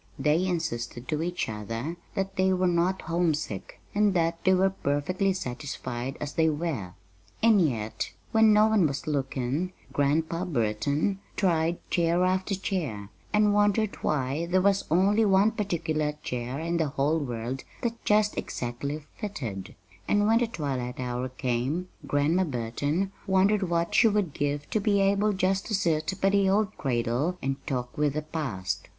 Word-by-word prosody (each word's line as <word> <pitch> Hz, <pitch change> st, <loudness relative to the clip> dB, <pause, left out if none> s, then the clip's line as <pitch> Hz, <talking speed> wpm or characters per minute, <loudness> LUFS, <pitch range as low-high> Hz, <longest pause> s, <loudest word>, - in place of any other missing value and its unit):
They 160 Hz, +5 st, +2 dB
insisted 125 Hz, -8 st, -3 dB
to 155 Hz, -1 st, 0 dB
each 175 Hz, +1 st, -2 dB
other 115 Hz, -, -4 dB, 0.2 s
that 195 Hz, -1 st, -2 dB
they 190 Hz, 0 st, +3 dB
were 185 Hz, 0 st, +1 dB
not 180 Hz, +2 st, +1 dB
homesick, 160 Hz, -, -1 dB
and 205 Hz, -2 st, +3 dB
that 165 Hz, -1 st, 0 dB
they 190 Hz, 0 st, +5 dB
were 190 Hz, +1 st, +3 dB
perfectly 185 Hz, +4 st, 0 dB
satisfied 130 Hz, -5 st, -4 dB
as 145 Hz, -1 st, -4 dB
they 160 Hz, -1 st, +3 dB
were. 145 Hz, -, -3 dB, 0.5 s
And 220 Hz, -4 st, +6 dB
yet 115 Hz, -9 st, -1 dB, 0.2 s
When 220 Hz, -1 st, +6 dB
no 210 Hz, 0 st, +6 dB
one 215 Hz, -6 st, +4 dB
was 140 Hz, -1 st, -4 dB
looking 140 Hz, +4 st, -1 dB, 0.2 s
Grandpa 160 Hz, +5 st, +1 dB
Burton 140 Hz, -, 0 dB, 0.2 s
tried 170 Hz, -3 st, +1 dB
chair 170 Hz, +1 st, +2 dB
after 185 Hz, +2 st, 0 dB
chair, 150 Hz, -, -3 dB, 0.2 s
and 210 Hz, -1 st, +4 dB
wondered 205 Hz, +1 st, +2 dB
why 145 Hz, +3 st, -1 dB
there 185 Hz, +1 st, +2 dB
was 195 Hz, 0 st, +3 dB
only 195 Hz, +7 st, +4 dB
one 200 Hz, +1 st, +4 dB
particular 160 Hz, -7 st, -1 dB
chair 125 Hz, +2 st, -3 dB
in 170 Hz, +1 st, -1 dB
the 160 Hz, -2 st, +1 dB
whole 145 Hz, +3 st, +1 dB
world 125 Hz, -1 st, -4 dB, 0.2 s
that 235 Hz, -1 st, -2 dB
just 210 Hz, 0 st, +3 dB
exactly 140 Hz, +5 st, -4 dB
"fitted;" 120 Hz, -, -5 dB, 0.3 s
and 205 Hz, 0 st, +3 dB
when 225 Hz, +2 st, +4 dB
the 240 Hz, -, +1 dB
twilight 135 Hz, -, -3 dB
hour 125 Hz, 0 st, -2 dB
came 130 Hz, +8 st, -2 dB, 0.2 s
Grandma 150 Hz, +6 st, +2 dB
Burton 145 Hz, +8 st, -1 dB, 0.2 s
wondered 190 Hz, 0 st, +3 dB
what 170 Hz, 0 st, 0 dB
she 235 Hz, -, +6 dB
would 205 Hz, -7 st, +1 dB
give 145 Hz, 0 st, -2 dB
to 215 Hz, -, +2 dB
be 200 Hz, -1 st, +2 dB
able 200 Hz, +2 st, +3 dB
just 190 Hz, 0 st, 0 dB
to 215 Hz, -, 0 dB
sit 165 Hz, -4 st, +1 dB
by 195 Hz, -, +3 dB
the 200 Hz, -1 st, +3 dB
old 210 Hz, +1 st, +1 dB
cradle 125 Hz, +6 st, 0 dB
and 135 Hz, 0 st, -1 dB
talk 125 Hz, -4 st, -3 dB
with 150 Hz, -1 st, +1 dB
the 155 Hz, -, -1 dB
past. 100 Hz, -, -3 dB
165 Hz, 160 wpm, -27 LUFS, 135-190 Hz, 0.5 s, And